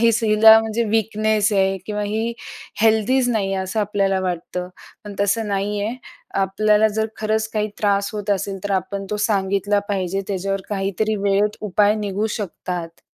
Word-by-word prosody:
ही - - +6
हिला 220 0 +7
म्हणजे 225 +1 -1
वीकनेस 215 0 +1
आहे 195 -1 +2
किंवा 210 -1 -2
ही 220 +3 -1 0.5
हेल्दीच 225 +4 +3
नाही 205 -5 0
आहे, 190 - -1
असं 190 +4 -2
आपल्याला 195 -2 0
वाटतं. 180 0 -3 0.4
पण 205 -1 -8
तसं 205 +2 +1
नाही 200 +1 -1
आहे. 225 +4 -3 0.4
आपल्याला 210 +3 +3
जर 220 +1 -1
खरंच 220 0 -1
काही 215 -1 0
त्रास 200 -1 +1
होत 210 -1 -4
असेल, 195 0 -1
तर 205 - -3
आपण 195 +1 -2
तो 210 - -1
सांगितला 200 0 +1
पाहिजे. 195 -1 -1
त्याच्यावर 195 0 -2
काहीतरी 200 +2 -1
वेळेत 200 +1 +1
उपाय 210 0 +2
निघू 210 0 -2
शकतात. 175 -3 -5
205 Hz, 160 wpm, -21 LUFS, 195-215 Hz, 0.5 s, हिला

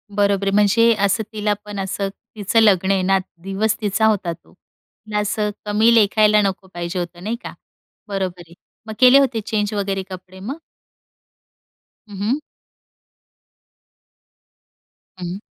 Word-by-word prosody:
बरोबर 200 -1 +2
आहे. - - +2
म्हणजे 230 +3 +4
असं 200 +3 +1
तिला 210 -1 0
पण 205 -1 -6
असं 195 +1 -2 0.3
तिचं 210 +2 +1
लग्न 195 -3 +4
आहे 195 -1 +2
ना 195 +1 +3 0.3
दिवस 200 +3 0
तिचा 215 +1 +1
होता 200 -5 +1
तो. 165 - -20
तिला 210 +3 -8
असं 210 0 -1 0.2
कमी 215 +3 +3
लेखायला 210 -1 +4
नको 195 -1 -2
पाहिजे 175 +1 -4
होतं 175 0 -6
नाही 220 +4 -2
का - - -7 0.5
बरोबर 190 -3 -3
आहे. 170 - -16 0.3
मग 220 - -5
केले 255 +2 +8
होते 255 -5 +1
चेंज 215 -2 -1
वगैरे 195 -2 -2
कपडे 185 0 -10
मग? 255 +11 -6 1.5
हं, 205 -2 -10
हं. 220 +9 0 2.8
हं. 180 +2 -5
205 Hz, 140 wpm, -20 LUFS, 190-215 Hz, 2.8 s, केले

